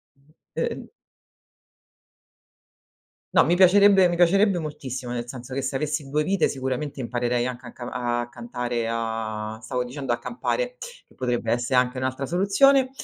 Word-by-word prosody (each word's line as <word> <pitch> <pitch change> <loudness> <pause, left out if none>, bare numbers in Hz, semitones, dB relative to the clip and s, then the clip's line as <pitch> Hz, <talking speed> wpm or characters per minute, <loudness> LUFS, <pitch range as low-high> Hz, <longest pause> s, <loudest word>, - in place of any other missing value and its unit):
Mh. 140 +3 -29 0.2
E, - - -1
ehm - - -8 2.4
No, - - +6
mi 170 - +3
piacerebbe 190 0 +6
mi 175 - -1
piacerebbe 190 +2 +4
moltissimo, 130 -5 -5
nel 120 -1 -3
senso 125 +1 -8
che 135 - -1
se 135 +1 -2
avessi 150 -1 -3
2 150 +2 +1
vite 195 -2 +2
sicuramente 130 +1 -3
imparerei 120 0 -1
anche 125 0 -5
a - - -9
ca 120 - -9
a 120 -1 -2
cantare 120 -1 -3
a 110 -1 -3
stavo 125 +2 -2
dicendo 135 0 -4
a 120 - 0
campare, - - -2 0.3
che - - -24
potrebbe 125 -3 -2
essere 125 +1 +2
anche 125 +1 0
un'altra 130 +1 -2
soluzione. 255 - +4
130 Hz, 155 wpm, -24 LUFS, 120-170 Hz, 2.4 s, No